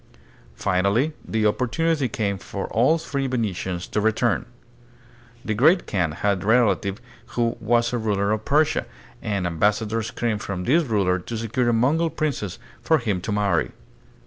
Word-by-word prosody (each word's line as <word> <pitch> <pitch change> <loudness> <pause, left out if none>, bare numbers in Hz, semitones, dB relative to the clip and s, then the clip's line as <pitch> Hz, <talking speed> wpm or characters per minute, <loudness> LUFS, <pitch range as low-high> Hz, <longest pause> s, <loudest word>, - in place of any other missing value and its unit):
Finally 100 - +1
the 110 -1 -1
opportunity 135 +6 +1
came 100 -3 -2
for 95 +2 -5
the 130 +9 +4
three 140 -4 -3
Venetians 95 -7 -2
to 105 - -2
return. 110 +3 +1 1.0
The 110 - 0
Great 155 - +4
Kaan 85 -6 -1
had 100 +2 0
a - - -7
relative 105 -3 +2 0.4
who 115 -1 +1
was 120 +1 +1
a 120 - 0
ruler 100 -2 0
of 110 0 -1
Persia, 150 +4 +2 0.3
and 100 -3 -2
ambassadors 105 +6 0
came 115 -3 -2
from 95 -3 -4
this 150 - +3
ruler 100 -6 +1
to 115 +6 -6
secure 115 +2 0
a - - +2
Mongol 150 +9 +2
princess 140 - -3 0.2
for 160 - +3
him 105 -9 -2
to 110 - -4
marry. 100 -5 +1
110 Hz, 155 wpm, -23 LUFS, 100-125 Hz, 1.0 s, the